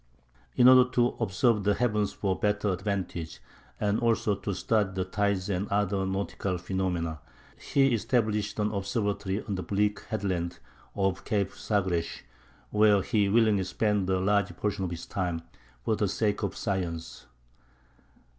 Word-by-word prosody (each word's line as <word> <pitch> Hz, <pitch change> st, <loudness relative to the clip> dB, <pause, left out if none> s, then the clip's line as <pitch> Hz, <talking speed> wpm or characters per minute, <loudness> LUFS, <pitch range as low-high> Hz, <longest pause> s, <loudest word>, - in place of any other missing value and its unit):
In 125 Hz, -, +6 dB
order 130 Hz, 0 st, +8 dB
to 120 Hz, -1 st, +4 dB
observe 110 Hz, +1 st, +2 dB
the 100 Hz, 0 st, +2 dB
heavens 105 Hz, -4 st, 0 dB
to 95 Hz, -2 st, 0 dB
better 105 Hz, +1 st, 0 dB
advantage, 95 Hz, -3 st, -3 dB, 0.4 s
and 105 Hz, 0 st, +1 dB
also 115 Hz, -3 st, +2 dB
to 100 Hz, -, -4 dB
study 105 Hz, -1 st, +1 dB
the 95 Hz, -1 st, -1 dB
tides 100 Hz, 0 st, 0 dB
and 100 Hz, 0 st, -1 dB
other 100 Hz, -1 st, 0 dB
nautical 95 Hz, -1 st, -2 dB
phenomena, 90 Hz, -3 st, -2 dB, 0.4 s
he 135 Hz, -2 st, +2 dB
established 110 Hz, -2 st, 0 dB
an 105 Hz, 0 st, 0 dB
observatory 100 Hz, -1 st, -2 dB
on 100 Hz, -, -4 dB
the 95 Hz, -, -2 dB
bleak 105 Hz, +2 st, 0 dB
headland 90 Hz, -5 st, -2 dB, 0.4 s
of 95 Hz, -1 st, 0 dB
Cape 100 Hz, -2 st, 0 dB
Sagres, 95 Hz, -5 st, -1 dB, 0.5 s
where 105 Hz, -2 st, +4 dB
he 105 Hz, -4 st, +1 dB
willingly 110 Hz, -2 st, +3 dB
spent 100 Hz, 0 st, 0 dB
a 95 Hz, -1 st, +2 dB
large 100 Hz, +1 st, +1 dB
portion 105 Hz, -2 st, -1 dB
of -, -, -3 dB
his 85 Hz, -1 st, -6 dB
time 90 Hz, -4 st, -3 dB, 0.4 s
for 110 Hz, -, +2 dB
the 105 Hz, -, 0 dB
sake 105 Hz, +1 st, 0 dB
of 100 Hz, -, -3 dB
science. 90 Hz, -, -3 dB
100 Hz, 145 wpm, -28 LUFS, 95-105 Hz, 0.5 s, order